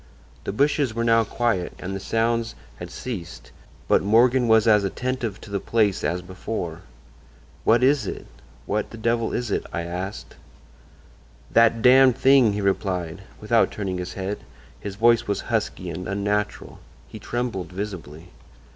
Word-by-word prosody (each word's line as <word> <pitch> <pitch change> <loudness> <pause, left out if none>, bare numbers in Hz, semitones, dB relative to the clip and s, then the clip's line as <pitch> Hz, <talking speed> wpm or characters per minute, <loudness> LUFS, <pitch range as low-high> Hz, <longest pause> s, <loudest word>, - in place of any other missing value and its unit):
"The - - -2
bushes 140 +1 +1
were 115 - 0
now 115 -1 +4
quiet 110 -5 -1
and 95 +1 -5
the - - -4
sounds 115 +2 0 0.2
had - - -8
ceased, 95 -9 -7 0.4
but - - +4
Morgan 120 +4 +4
was 110 0 +4
as 105 -2 +5
attentive 115 +1 -3
to 105 - -12
the 100 - -1
place 105 -2 +1
as 90 +1 -1
before. 90 -2 -5 0.8
"'What 115 +2 +4
is 135 -5 +3
it? - - -6 0.4
What 105 +1 -2
the 115 - -10
devil 115 0 0
is 120 -3 -2
it?' - - -1
I 85 +2 -3
asked. 90 +4 -6 1.2
"'That 115 -1 +4
Damned 130 0 +6
Thing!' 130 -6 +5
he 105 - -2
replied, 95 -3 -1 0.2
without 115 +2 +2
turning 95 -3 -4
his 90 0 -5
head. 100 +1 -4 0.4
His 100 -1 -6
voice 115 +2 +3
was 100 - -1
husky - - -1
and 90 - -6
unnatural. 105 +1 -2 0.3
He - - -10
trembled 120 -8 -3
visibly. 90 -4 -7
105 Hz, 155 wpm, -24 LUFS, 95-115 Hz, 1.2 s, Damned